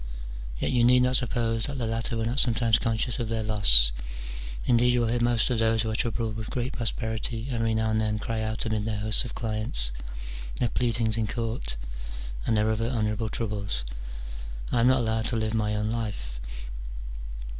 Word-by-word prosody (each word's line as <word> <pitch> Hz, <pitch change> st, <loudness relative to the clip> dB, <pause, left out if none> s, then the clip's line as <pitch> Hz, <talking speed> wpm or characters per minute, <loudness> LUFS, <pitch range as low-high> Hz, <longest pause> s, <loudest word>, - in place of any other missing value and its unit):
Yet -, -, -1 dB
you 120 Hz, -2 st, +3 dB
need 125 Hz, +1 st, +6 dB
not 125 Hz, 0 st, +4 dB
suppose 115 Hz, -2 st, 0 dB
that 140 Hz, 0 st, -4 dB
the 120 Hz, -, -1 dB
latter 115 Hz, +1 st, -1 dB
were 110 Hz, -, -1 dB
not 120 Hz, +4 st, +1 dB
sometimes 115 Hz, -2 st, +4 dB
conscious 115 Hz, +1 st, 0 dB
of 115 Hz, -2 st, -2 dB
their 115 Hz, -1 st, -1 dB
loss: 95 Hz, -, +8 dB, 0.7 s
indeed, 120 Hz, 0 st, +4 dB
you 120 Hz, -, +3 dB
will 115 Hz, -, +1 dB
hear 120 Hz, +1 st, +1 dB
most 120 Hz, 0 st, +2 dB
of 120 Hz, -, +1 dB
those 115 Hz, 0 st, +3 dB
who 110 Hz, -, -1 dB
are -, -, -1 dB
troubled 110 Hz, -1 st, -1 dB
with 110 Hz, 0 st, -5 dB
great 125 Hz, +1 st, -2 dB
prosperity 115 Hz, 0 st, -2 dB
every 115 Hz, -2 st, +1 dB
now 110 Hz, 0 st, +1 dB
and 110 Hz, 0 st, +2 dB
then 105 Hz, 0 st, 0 dB
cry 110 Hz, +1 st, -2 dB
out 110 Hz, +1 st, -2 dB
amid 110 Hz, -1 st, -1 dB
their 110 Hz, -2 st, -1 dB
hosts 110 Hz, +3 st, +3 dB
of 120 Hz, -, -7 dB
clients, 110 Hz, -, -1 dB, 0.6 s
their 120 Hz, -, 0 dB
pleadings 115 Hz, -2 st, +1 dB
in 110 Hz, -1 st, 0 dB
court, 110 Hz, -, -3 dB, 0.7 s
and 110 Hz, -, +3 dB
their 105 Hz, +1 st, +3 dB
other 115 Hz, +1 st, 0 dB
honourable 110 Hz, -2 st, -1 dB
troubles, 100 Hz, -, -2 dB, 0.4 s
" -, -, -9 dB
I -, -, +2 dB
am 115 Hz, -, +5 dB
not 130 Hz, 0 st, +4 dB
allowed 110 Hz, -1 st, 0 dB
to 120 Hz, -, -1 dB
live 110 Hz, -1 st, 0 dB
my 105 Hz, -1 st, +1 dB
own 105 Hz, +1 st, 0 dB
life." 100 Hz, -, -4 dB
110 Hz, 200 wpm, -27 LUFS, 110-120 Hz, 0.7 s, loss